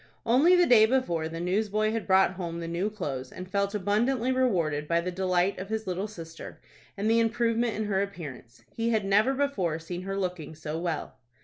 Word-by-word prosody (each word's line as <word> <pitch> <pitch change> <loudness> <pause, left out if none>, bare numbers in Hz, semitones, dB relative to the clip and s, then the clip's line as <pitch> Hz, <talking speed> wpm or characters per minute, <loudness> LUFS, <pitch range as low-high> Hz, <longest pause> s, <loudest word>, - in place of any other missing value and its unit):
Only 275 +10 +5
the 355 -1 +5
day 220 -6 +6
before, 175 -11 0
the 165 +1 -6
newsboy 210 +4 0
had 225 -1 -3
brought 190 -1 +5
home 170 -2 -5
the 165 - -5
new 170 +5 -1
clothes, 140 -11 -5
and 185 - -8
felt 200 +2 -1
abundantly 225 +6 +1
rewarded 170 - +1
by 170 +1 +2
the 180 +2 -3
delight 185 +1 0
of 190 +2 -6
his 220 0 -2
little 185 +3 -2
sister, 165 -6 -10 0.4
and 205 +2 -1
the 225 +1 +4
improvement 230 0 +1
in 220 - -2
her 195 -2 +1
appearance. 145 -12 -7
He 230 0 0
had 220 -3 +1
never 210 +7 +3
before 260 - 0
seen 175 +2 -6
her 195 +1 -4
looking 180 -5 -4
so 155 +1 -5
well. 170 -3 -4
195 Hz, 200 wpm, -28 LUFS, 170-220 Hz, 0.4 s, day